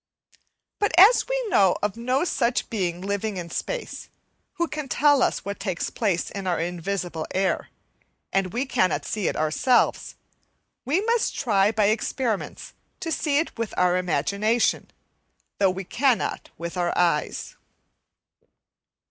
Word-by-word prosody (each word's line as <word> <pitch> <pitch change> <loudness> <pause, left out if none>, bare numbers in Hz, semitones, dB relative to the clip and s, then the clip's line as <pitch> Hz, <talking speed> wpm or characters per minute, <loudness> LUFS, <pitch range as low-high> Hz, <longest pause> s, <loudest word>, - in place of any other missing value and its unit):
But 410 -5 0
as 405 +7 +7
we - - -1
know 190 - +4
of 210 -2 0
no 255 +5 0
such 245 -8 0
being 180 -5 -2
living 200 +1 -2
in 170 -2 -6
space, - - -5 0.4
who 340 - -1
can 300 -2 -5
tell 290 +1 +3
us - - 0
what 200 0 -5
takes 185 -5 -3
place 195 -7 -1
in 195 -2 -5
our 175 -2 0
invisible 175 -1 -3
air, 190 0 0 0.6
and 195 -2 +1
we 250 +6 -1
cannot 185 -8 0
see 210 -5 -2
it - - -1
ourselves, 155 +11 +1 0.7
we 305 +9 +1
must 465 0 +1
try 210 -6 +2
by 215 -1 +2
experiments 220 +1 -2 0.3
to 335 -3 -4
see 295 -3 +1
it 320 - -1
with 230 -3 -3
our 180 0 +3
imagination, 200 +6 0 0.7
though 195 -1 +4
we 185 +1 -4
cannot 250 +6 0
with 170 +2 -6
our 175 -1 0
eyes. 170 -4 0
205 Hz, 140 wpm, -24 LUFS, 185-270 Hz, 0.7 s, as